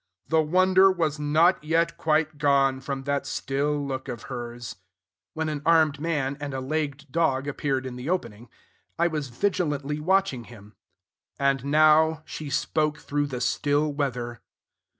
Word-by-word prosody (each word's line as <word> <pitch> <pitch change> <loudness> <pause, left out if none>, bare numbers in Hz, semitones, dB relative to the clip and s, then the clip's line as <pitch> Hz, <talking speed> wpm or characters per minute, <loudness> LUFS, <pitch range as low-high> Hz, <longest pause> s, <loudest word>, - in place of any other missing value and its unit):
"The 160 0 +4
wonder 185 +4 +4
was 160 -5 -1
not 155 +4 +3
yet 165 +2 +1
quite 155 -1 0
gone 140 -2 +3
From 135 0 -5
that 140 0 -1
still 145 +2 -1
look 130 -1 -4
of 120 -3 -6
hers," 120 -2 -6 0.6
when 160 0 -2
an 150 -2 -3
armed 160 -3 +3
man 145 -4 -1
and 145 -2 -5
a - - -2
legged 145 +1 -3
dog 145 -5 +1
appeared 135 -2 -2
in 125 -1 -6
the 125 +5 -5
opening. 120 - -3 0.5
I 170 - +2
was 155 -4 -1
vigilantly 150 -2 -1
watching 180 -7 +1
him..... 105 -3 -14 0.6
"And 140 -2 +1
now 155 +1 +4
She 155 -2 -7
spoke 150 +2 0
through 145 0 -2
the 125 -3 -5
still 145 +2 +1
weather." 125 -5 -3
145 Hz, 150 wpm, -26 LUFS, 135-160 Hz, 0.6 s, The